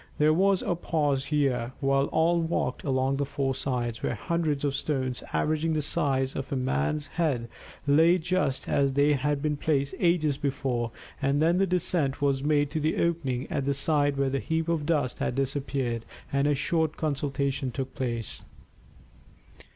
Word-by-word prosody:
There 155 +1 +4
was 195 +3 +3
a 180 - 0
pause 145 -5 0
here 130 -5 0
while 135 0 +2
all 170 +3 +2
walked 165 +1 -1
along 135 -1 +1
the 140 - 0
four 135 -1 -1
sides, 125 -3 -2
where - - -1
hundreds 150 +3 -1
of 140 - 0
stones 130 -3 -2
averaging 155 +1 0
the 155 - +1
size 135 -4 0
of 135 - -5
a - - 0
man's 130 - 0
head 145 -7 -1 0.4
lay 160 +5 +5
just 170 -6 -1
as 140 -1 +2
they 145 +2 +4
had 145 +1 0
been 150 -1 0
placed 140 -1 0
ages 160 -5 +2
before; 130 -4 -1 0.3
and 140 +1 +2
then 170 +3 +3
the 195 - +3
descent 170 -6 0
was 140 -2 +1
made 145 -1 +2
to 155 - -1
the 155 +1 0
opening 145 -7 0
at 140 - -1
the 140 0 +1
side 145 0 +2
where 135 -1 +1
the 135 - 0
heap 160 +2 -1
of 155 -3 0
dust 145 -7 0
had - - -1
disappeared, 135 -3 -1 0.3
and 140 +1 +2
a 145 - +3
short 160 +2 0
consultation 140 -2 -1
took 130 +1 -5
place. 120 -5 -3
140 Hz, 175 wpm, -27 LUFS, 135-155 Hz, 0.4 s, lay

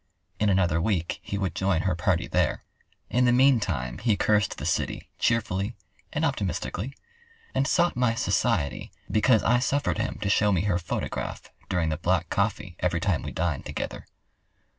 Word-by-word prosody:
In 105 - +3
another 90 -4 +2
week 90 -4 -1
he 100 - -4
would 95 -5 -1
join 95 -2 +1
her 95 - +1
party 85 0 +1
there. - - 0 0.5
In 125 +3 +3
the 120 - +5
meantime, 100 - +2
he 110 -2 +2
cursed 105 -1 +2
the - - -5
city - - -2
cheerfully 110 -1 0 0.4
and - - 0
optimistically, 125 +10 -2 0.6
and 135 - +1
sought 175 +1 +2
my 125 -2 +2
society 100 - 0 0.2
because 110 0 +4
I 120 +2 +4
suffered 140 +3 0
him - - -2
to - - -1
show 105 +1 +3
me 90 -4 +2
her 95 -3 +1
photograph 85 - -4 0.2
during 85 -3 +1
the 75 - -1
black 85 0 0
coffee 100 -3 -1
every 90 -1 0
time 90 -4 0
we - - -5
dined 80 -4 -2
together. - - -5
100 Hz, 165 wpm, -26 LUFS, 85-115 Hz, 0.6 s, the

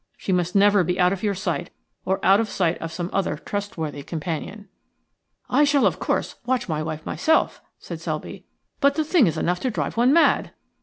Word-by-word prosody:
She - - -4
must 180 0 0
never 200 -1 +5
be 180 +2 -2
out 180 +1 +4
of 195 - -5
your 205 -2 0
sight 180 -6 -3 0.4
or 190 +1 0
out 195 +2 +6
of 225 - 0
the - - -10
sight 175 -3 +1
of 165 - -5
some 175 +1 -4
other 195 -5 0
trustworthy 170 -6 -5
companion." 170 +7 -5 0.8
"I 295 - +3
shall, 285 -1 +3
of - - +1
course, - - -2
watch 245 -1 -1
my 155 -3 -2
wife 155 0 -5
myself," 320 0 +1 0.2
said - - -8
Selby. - - -5 0.4
"But 280 0 +3
the 315 - +1
thing 315 - +4
is 160 - -1
enough 180 +1 0
to 255 - -1
drive 225 - -3
one 245 +3 +4
mad." 330 +3 +3
195 Hz, 205 wpm, -23 LUFS, 170-235 Hz, 0.8 s, out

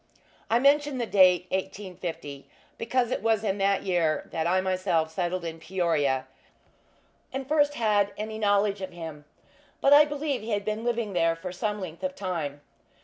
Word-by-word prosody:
I 230 - +4
mention 285 +1 +3
the 240 - -1
date, 185 -4 +5
1850, 175 -7 -5 0.3
because 240 +1 0
it - - -1
was 225 -2 +1
in 200 -1 -1
that 195 0 +2
year 170 -5 0
that 160 0 -1
I 185 +2 +3
myself 185 -4 0
settled 175 +1 -2
in 165 0 -5
Peoria, 160 -7 0 1.1
and 265 0 -5
first 290 -1 +2
had 205 -3 +2
any 215 +1 -5
knowledge 205 -1 +2
of 190 - -6
him; 160 -4 -8 0.5
but 275 - +5
I 295 +1 +9
believe 290 -3 -2
he 220 +1 -3
had 205 -1 -1
then 215 0 -1
been 225 - -7
living 235 -4 -1
there 165 -1 +2
for 180 +2 -7
some 210 +3 -2
length 175 -2 -7
of 185 0 -3
time. 160 -7 -4
190 Hz, 175 wpm, -27 LUFS, 170-225 Hz, 1.1 s, I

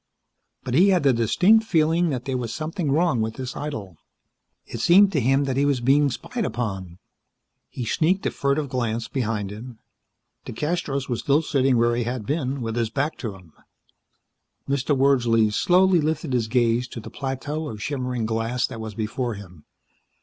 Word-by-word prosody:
But 125 - -4
he 180 +9 +5
had 180 -5 +3
the 135 -2 +4
distinct 180 - +4
feeling 165 -3 +2
that 125 -4 -3
there 135 -2 -2
was 115 -2 -4
something 155 +2 -3
wrong 155 -5 +2
with 110 0 -2
this 130 -1 -6
idyll. 110 - -6 0.7
It - - -7
seemed 195 +3 +6
to 160 - +1
him 135 +3 +2
that 135 -2 -2
he 140 - +3
was 140 -3 +2
being 140 +4 +3
spied 230 - -4
upon. 100 - -4 0.7
He 125 - -5
sneaked 175 - +1
a - - +1
furtive 140 +1 0
glance 120 -3 -2
behind 110 -6 -2
him. 115 +3 -9 0.7
DeCastros 145 0 -3
was 120 -3 -2
still 145 +3 +2
sitting 135 -4 +2
where 120 0 +2
he 120 -1 -1
had 120 -2 -4
been, 140 -1 -2
with 115 0 -3
his 115 -2 0
back 145 +6 -1
to 110 -5 -5
him. 90 -5 -17 1.1
Mr. 140 +1 0
Wordsley 120 -5 +3
slowly 180 - +4
lifted 155 -2 -2
his 120 -3 +1
gaze 120 +1 +1
to 120 - -8
the 110 - -10
plateau 145 +3 -4
of 105 - -7
shimmering 125 -1 -3
glass 115 +2 -1
that 115 -3 -7
was 110 -2 -7
before 115 +2 -3
him. 90 -6 -13
130 Hz, 180 wpm, -24 LUFS, 115-150 Hz, 1.1 s, seemed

